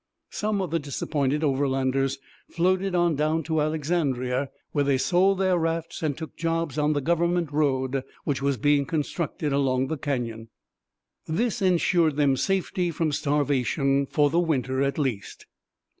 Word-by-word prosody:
Some 210 Hz, -2 st, -1 dB
of 175 Hz, -, -5 dB
the 165 Hz, -, +1 dB
disappointed 145 Hz, 0 st, -1 dB
Overlanders 135 Hz, -1 st, +1 dB, 0.3 s
floated 185 Hz, +2 st, +1 dB
on 175 Hz, -1 st, +3 dB
down 155 Hz, +3 st, 0 dB
to 160 Hz, 0 st, 0 dB
Alexandria, 140 Hz, -4 st, -1 dB, 0.2 s
where 145 Hz, -, +1 dB
they 140 Hz, -1 st, +2 dB
sold 185 Hz, +6 st, +3 dB
their 185 Hz, -2 st, +2 dB
rafts 165 Hz, 0 st, -2 dB
and 150 Hz, -3 st, -1 dB
took 160 Hz, -1 st, -8 dB
jobs 165 Hz, -2 st, -1 dB
on 150 Hz, +1 st, +2 dB
the 145 Hz, -, -1 dB
government 170 Hz, +1 st, +1 dB
road 135 Hz, -3 st, 0 dB, 0.2 s
which 140 Hz, -2 st, -1 dB
was 140 Hz, -1 st, +1 dB
being 145 Hz, 0 st, +2 dB
constructed 150 Hz, -1 st, -2 dB
along 135 Hz, -1 st, +1 dB
the 160 Hz, -, -3 dB
canyon. 115 Hz, -6 st, -3 dB, 0.8 s
This 225 Hz, +8 st, -1 dB
ensured 175 Hz, -4 st, +3 dB
them 140 Hz, -2 st, +3 dB
safety 185 Hz, +2 st, 0 dB
from 160 Hz, -1 st, -1 dB
starvation 140 Hz, -1 st, +1 dB
for 145 Hz, 0 st, +2 dB
the 170 Hz, -, +2 dB
winter 135 Hz, -6 st, 0 dB
at 140 Hz, 0 st, 0 dB
least. 130 Hz, -10 st, -3 dB
150 Hz, 150 wpm, -25 LUFS, 135-165 Hz, 0.8 s, on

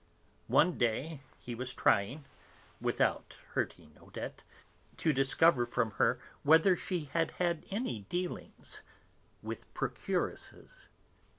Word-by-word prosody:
One 175 Hz, +2 st, +4 dB
day, 130 Hz, +6 st, 0 dB, 0.2 s
he 120 Hz, -, -7 dB
was 125 Hz, +2 st, -4 dB
trying 125 Hz, +9 st, +2 dB, 0.5 s
without -, -, 0 dB, 0.2 s
hurting 75 Hz, -1 st, -3 dB
Odette -, -, -7 dB, 0.5 s
to 160 Hz, -, +2 dB
discover 135 Hz, -1 st, +4 dB
from 120 Hz, -2 st, 0 dB
her 120 Hz, +2 st, +4 dB, 0.2 s
whether 160 Hz, +5 st, +6 dB
she 175 Hz, -1 st, -2 dB
had 165 Hz, -1 st, +2 dB
ever -, -, -19 dB
had 170 Hz, -2 st, 0 dB
any 200 Hz, -, -2 dB
dealings 180 Hz, 0 st, -5 dB, 0.6 s
with -, -, -6 dB
procuresses. -, -, -3 dB
150 Hz, 110 wpm, -33 LUFS, 120-170 Hz, 0.6 s, whether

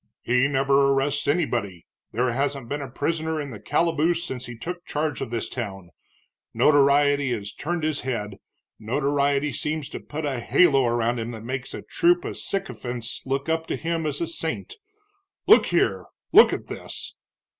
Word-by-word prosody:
"He 125 Hz, +3 st, +3 dB
never 140 Hz, 0 st, +3 dB
arrests 140 Hz, +2 st, 0 dB
anybody, 120 Hz, -, -1 dB, 0.3 s
there 125 Hz, +2 st, +1 dB
hasn't 135 Hz, 0 st, -2 dB
been 145 Hz, +4 st, -3 dB
a 135 Hz, -, -6 dB
prisoner 160 Hz, +4 st, -2 dB
in 145 Hz, -2 st, -5 dB
the 105 Hz, -, -8 dB
calaboose 165 Hz, +7 st, +1 dB
since 130 Hz, -5 st, -5 dB
he 120 Hz, -1 st, -8 dB
took 175 Hz, +8 st, -6 dB
charge 150 Hz, -3 st, -2 dB
of 130 Hz, -, -3 dB
this 115 Hz, -1 st, -2 dB
town. 95 Hz, -7 st, -6 dB, 0.6 s
Notoriety 145 Hz, -1 st, +4 dB
has 100 Hz, -3 st, -5 dB
turned 170 Hz, +1 st, -3 dB
his 155 Hz, -2 st, 0 dB
head, 105 Hz, -6 st, -3 dB, 0.4 s
notoriety 140 Hz, +4 st, 0 dB
seems 150 Hz, -1 st, -2 dB
to -, -, -6 dB
put 150 Hz, +1 st, -6 dB
a 135 Hz, -4 st, -1 dB
halo 135 Hz, 0 st, +4 dB
around 120 Hz, 0 st, 0 dB
him 115 Hz, +1 st, -3 dB
that 110 Hz, -1 st, -8 dB
makes 130 Hz, +2 st, -4 dB
a -, -, -7 dB
troop 175 Hz, +1 st, +2 dB
of -, -, -5 dB
sycophants 125 Hz, -, -4 dB
look 135 Hz, +2 st, -1 dB
up 160 Hz, 0 st, 0 dB
to -, -, -1 dB
him 165 Hz, -1 st, -2 dB
as 145 Hz, -1 st, -2 dB
a -, -, +1 dB
saint. 165 Hz, -, -3 dB, 0.7 s
Look -, -, +7 dB
here -, -, +1 dB, 0.3 s
look 440 Hz, -, +8 dB
at -, -, -3 dB
this!" -, -, -7 dB
140 Hz, 170 wpm, -24 LUFS, 120-155 Hz, 0.7 s, look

